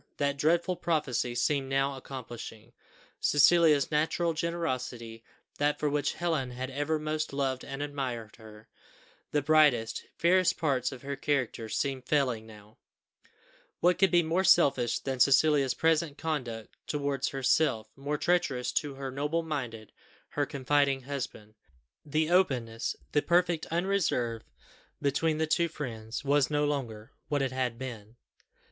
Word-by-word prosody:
That 140 0 0
dreadful 170 +4 +1
prophecy 135 -8 -1
seemed 135 +1 0
now 135 +1 +1
accomplishing: 120 -3 -9 0.5
Cecilia's 150 0 +4
natural 165 +2 +1
generosity, 130 -9 -3 0.4
that 145 0 +2
for 150 -1 0
which 145 0 0
Helen 160 -7 -1
had 130 +1 -5
ever 145 +3 -1
most 155 0 -2
loved 135 -2 -1
and 135 +1 -5
admired 130 -6 -4
her, 110 -1 -14 0.6
the 145 -2 0
brightest, 145 -7 +3
fairest 185 +1 +3
parts 135 -6 0
of 130 -1 -10
her 140 0 -3
character, 135 -5 -1
seemed 130 +1 -2
failing 125 -7 +1
now; 105 -1 -15 1.0
what 180 +1 +3
could 195 0 +5
be 175 0 +4
more 165 +4 +1
selfish 130 -10 +4
than 135 -2 -4
Cecilia's 140 -1 +4
present 160 -2 +1
conduct 125 -9 -4
towards 140 -2 -1
herself, 130 -4 +1
more 145 +2 -3
treacherous 145 -8 0
to 145 -2 -2
her 135 -1 -5
noble 150 +5 -1
minded, 125 -9 -5 0.4
her 145 -1 -1
confiding 140 -1 +1
husband! 125 -6 -6 0.5
The 155 +2 0
openness, 125 -11 +1 0.2
the 145 - +3
perfect 175 -1 +1
unreserve 165 - 0 0.6
between 150 +3 +1
the 160 - +1
two 170 +2 +2
friends, 120 -7 -6
was 145 0 +3
no 150 0 +1
longer 120 -7 -3 0.2
what 145 -2 0
it 135 - -1
had 130 -3 -2
been. 115 -4 -8
140 Hz, 140 wpm, -29 LUFS, 125-155 Hz, 1.0 s, could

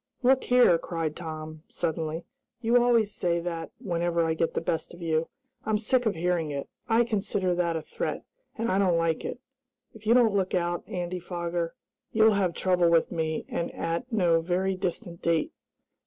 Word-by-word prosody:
"Look 260 +1 +4
here!" 245 -9 +5
cried 165 -3 -3
Tom, 155 -2 -7
suddenly. 160 0 -2 0.3
"You 240 +1 +4
always 230 -4 +3
say 170 -1 0
that 165 -1 -4
whenever 170 -6 0
I 160 - +1
get 165 +1 -1
the - - +2
best 165 +1 -3
of 175 - -14
you. 160 0 +1 0.4
I'm 215 -1 +1
sick 245 +3 +2
of 210 - 0
hearing 170 -1 0
it. 140 -1 -4 0.2
I 230 +1 +5
consider 200 -5 0
that 175 -1 0
a 160 - -3
threat, - - -4 0.3
and 230 +1 0
I 190 - +2
don't 180 -4 +3
like 165 -1 0
it. - - -4 0.5
If 220 -1 -12
you 230 - +6
don't 235 -4 +5
look 190 -2 +1
out, 175 -1 0
Andy 180 0 -3
Foger, 170 -1 -3 0.4
you'll 220 0 +5
have 185 -4 +1
trouble 180 -2 +3
with 165 -1 +3
me, 160 -2 -2
and 170 - -3
at 165 +9 -3
no 175 -6 +3
very 185 +3 0
distant 175 -1 -4
date!" 165 -2 +1
175 Hz, 185 wpm, -27 LUFS, 165-210 Hz, 0.5 s, you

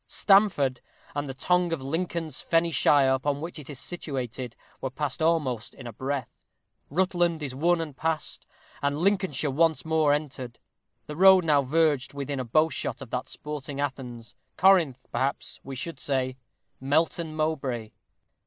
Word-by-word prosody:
Stamford, 195 -11 +3 0.3
and 145 -1 -3
the 135 - -5
tongue 180 +5 +2
of 165 - -1
Lincoln's 160 +1 -3
fenny 165 0 +2
shire, 140 -4 +4
upon 140 +2 0
which 165 +1 -6
it 145 - -11
is 145 - -7
situated, 130 -8 -5 0.3
were 135 - -2
passed 145 +2 -3
almost 150 -8 0
in - - -11
a 120 - -6
breath. 135 +2 -5 0.4
Rutland 175 -1 +1
is 135 -3 -4
won 170 +6 +2
and 155 -4 -5
passed, 160 +1 -3 0.3
and 145 0 0
Lincolnshire 180 -6 +1
once 160 +3 +2
more 160 -2 +3
entered. 130 -5 -3 0.5
The 150 - -7
road 190 -1 +7
now 150 -3 +4
verged 145 -1 +1
within 140 -1 -3
a - - -1
bowshot 155 +7 0
of 125 - -13
that 130 +1 -3
sporting 145 -2 -6
Athens 125 -4 -5 0.2
Corinth, 170 -9 +4
perhaps, 135 +1 -2
we 135 - -7
should 165 +7 -5
say 130 -2 -1 0.4
Melton 155 +3 0
Mowbray. 135 -8 -2
145 Hz, 155 wpm, -27 LUFS, 130-165 Hz, 0.5 s, road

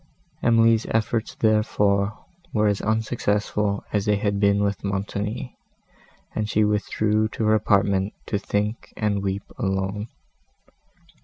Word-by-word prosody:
Emily's 115 -1 +4
efforts, 115 0 -1
therefore, 105 -2 +1 0.3
were 105 -1 +2
as 100 -1 +1
unsuccessful 105 -2 0
as 105 -2 +1
they 105 - +3
had 100 0 0
been 100 0 +3
with 100 -1 -1
Montoni, 100 +4 -3 0.8
and 110 -1 -2
she 110 - +3
withdrew 105 +1 +1
to 110 0 -3
her 110 - +4
apartment 100 -2 +2
to 100 - -1
think 105 +2 -2
and 105 -2 0
weep 100 0 -2 0.2
alone. 95 0 -1
105 Hz, 125 wpm, -24 LUFS, 100-110 Hz, 0.8 s, Emily's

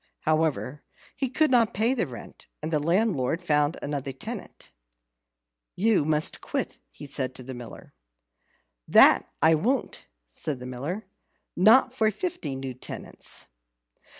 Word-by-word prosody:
However, 155 -3 0 0.3
he 265 -1 -1
could 305 +3 +2
not 235 -3 +3
pay 225 +5 +3
the 245 - -1
rent, 125 -3 -11 0.2
and 160 +1 -3
the 150 - +3
landlord 170 - +1
found 150 -3 +1
another 140 -1 -3
tenant. 130 - -8 1.0
"You 205 -5 +3
must 155 0 +1
quit," - - -3 0.3
said 135 -2 0
he - - -24
to 130 - -9
the 130 +1 -7
Miller. 120 -2 -10 0.9
"That - - +6
I 160 +1 +7
won't," 235 - -1 0.2
said 135 - -3
the 125 - -9
Miller, 145 - -5 0.5
"not 230 +7 +6
for 220 -4 +2
fifty 215 - -4
new 135 -1 -5
tenants." 125 - -6
155 Hz, 135 wpm, -26 LUFS, 135-220 Hz, 1.0 s, I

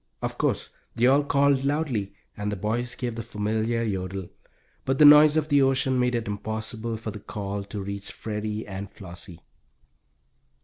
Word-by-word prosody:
Of - - -3
course - - 0 0.2
they 120 +1 +2
all 140 +3 +5
called 140 -1 +3
loudly, 135 -9 -1 0.2
and 105 0 -3
the - - -2
boys 115 +5 -2
gave 120 -2 -3
the 115 - -5
familiar 110 +1 -1
yodel, 95 -3 -3 0.5
but 135 0 0
the 150 - +7
noise 150 +1 +9
of 155 0 0
the 145 -1 +5
ocean 130 -1 +2
made 125 0 +2
it 115 -3 -2
impossible 110 +2 -4
for 110 0 -5
the 105 - -8
call 100 0 -5
to 100 0 -5
reach 100 +1 -6
Freddie 105 0 -4
and 100 0 -6
Flossie. 85 -2 -9
110 Hz, 170 wpm, -26 LUFS, 100-130 Hz, 0.5 s, noise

